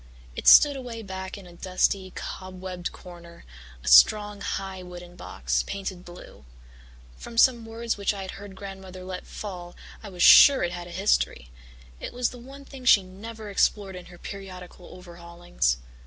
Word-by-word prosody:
It - - -5
stood 290 -1 +8
away 240 -4 -7
back 190 0 -7
in 200 - -12
a 175 - -14
dusty, 185 +1 -1
cobwebbed 185 -1 -6
corner, 170 -1 -14 0.4
a - - -11
strong, 205 - +5
high 190 -1 -4
wooden 175 -1 -11
box, 60 - -2
painted 190 -2 -6
blue. 175 - -13 0.7
From 230 - -10
some 235 -2 +4
words 230 0 -3
which 200 - 0
I 200 -2 -6
had 190 - -7
heard 200 -1 -11
Grandmother 190 -1 -9
let 185 0 -7
fall 180 -4 -8 0.3
I 210 - -9
was 180 -2 -2
sure 280 -2 +8
it 175 - -1
had 175 0 -7
a - - -11
history; 170 - 0 0.5
it - - -7
was 245 0 -1
the 245 - -11
one 275 +3 -12
thing 270 -2 -12
she 210 -6 +6
never 210 +3 -9
explored 195 -1 0
in 180 -1 -10
her 175 - -14
periodical 185 -2 -10
overhaulings. 170 - -3
190 Hz, 170 wpm, -25 LUFS, 175-210 Hz, 0.7 s, stood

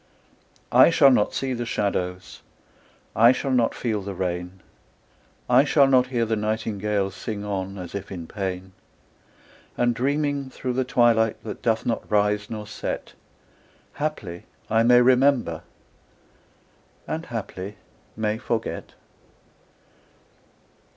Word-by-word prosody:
I - - +7
shall 140 -5 +6
not 105 -5 +2
see 135 -1 -1
the 120 -1 -3
shadows, 95 -5 -3 0.7
I 115 +3 +7
shall 135 +1 -2
not 120 -3 +2
feel 110 -4 -2
the 100 0 -6
rain; 90 0 -4 0.9
I 125 +2 +6
shall 145 -1 +4
not 130 -2 +4
hear 120 -3 0
the 110 0 0
nightingale 105 -2 -1
Sing 105 +1 -6
on, 95 -1 -4
as 90 -2 -8
if 100 -1 -6
in 85 -4 -6
pain: 95 0 -5 1.1
And 120 0 +2
dreaming 140 +2 -1
through 130 -1 -4
the 130 +1 +1
twilight 115 -3 +2
That - - -7
doth 115 -1 0
not 115 - -2
rise 105 0 +1
nor 110 -2 -5
set, - - -5 0.8
Haply 120 - -4 0.3
I 110 0 +4
may 120 +1 +6
remember 125 - +3 1.5
And 160 +1 -4
haply 105 -3 -6 0.4
may 110 0 -1
forget. 115 -2 -4
110 Hz, 125 wpm, -24 LUFS, 100-125 Hz, 1.5 s, I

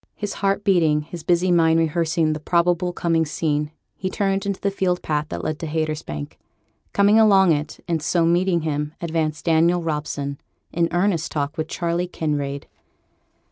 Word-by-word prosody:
His 205 -1 -4
heart 200 0 +1
beating, 165 -6 +3
his 170 +2 -8
busy 175 +2 +2
mind 165 -1 +4
rehearsing 165 0 +1
the 155 - -5
probable 175 +2 +1
coming 165 -2 +1
scene, 150 -1 -1 0.3
he 185 - -3
turned 195 0 -1
into 200 -1 -2
the 200 - 0
field 180 -2 -1
path 150 -1 -1
that - - -5
led 155 -1 -3
to 165 - -4
Haytersbank. 155 - -4 0.5
Coming 205 +2 +4
along 195 -5 +6
it, 150 0 -2
and 165 -2 -1
so 170 +2 +1
meeting 175 +1 +2
him, 150 -1 -3
advanced 160 -2 -2
Daniel 170 +1 +3
Robson, 145 -3 -3 0.3
in 170 0 +2
earnest 175 -2 0
talk 145 0 -2
with 155 -1 -3
Charley 170 +1 -2
Kinraid. 145 -4 -3
165 Hz, 165 wpm, -22 LUFS, 155-180 Hz, 0.5 s, along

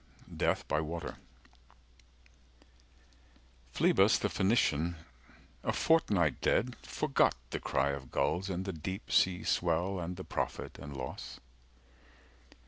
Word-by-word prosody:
DEATH - - 0
BY 75 - +1
WATER 80 +1 -5 2.5
Phlebas - - +4
the - - -1
Phoenician, 85 -5 +2 0.7
a - - +1
fortnight 100 - +2
dead, 125 +3 +2
Forgot 150 -3 +1 0.2
the - - -2
cry 70 +2 +1
of 70 -2 -6
gulls, 90 +5 0
and 95 0 -2
the 95 - -3
deep 95 +6 -6
seas 90 -2 +3
swell 90 +3 +1
And 90 +1 -4
the 95 - -7
profit - - -4
and 70 -1 -8
loss. 65 -1 -6
85 Hz, 115 wpm, -32 LUFS, 75-95 Hz, 2.5 s, Phlebas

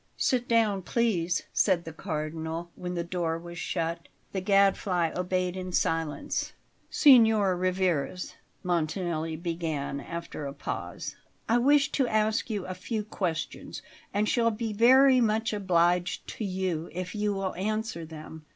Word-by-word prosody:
"Sit 250 -1 +1
down, 220 -4 +2
please," 185 -5 0
said 180 -4 +2
the 160 - -7
Cardinal, 160 0 -4
when 180 0 -5
the 170 - -1
door 170 -2 -2
was 170 0 -9
shut. 165 +1 -2 0.2
The 190 - -2
Gadfly 195 -3 +3
obeyed 180 0 -1
in 185 -1 -5
silence. 165 -3 -1 0.4
"Signor 220 - +6
Rivarez," 180 -2 -1 0.3
Montanelli 165 -1 -1
began 160 -4 -3
after 170 -2 -6
a 140 - -6
pause, - - -5 0.3
"I 235 +2 +3
wish 285 +3 +4
to 265 -3 +1
ask 215 +1 +1
you 205 -4 -2
a 185 - -4
few 210 +4 -3
questions, 175 -7 -4 0.3
and 205 +1 +1
shall 230 0 +3
be 225 0 -3
very 255 +4 +6
much 220 0 +1
obliged 175 -3 +1
to 220 - -4
you 185 -4 -2
if 185 +1 -5
you 210 -1 0
will 195 -1 -2
answer 215 -2 -2
them." 155 -1 -10
185 Hz, 140 wpm, -28 LUFS, 170-215 Hz, 0.4 s, Signor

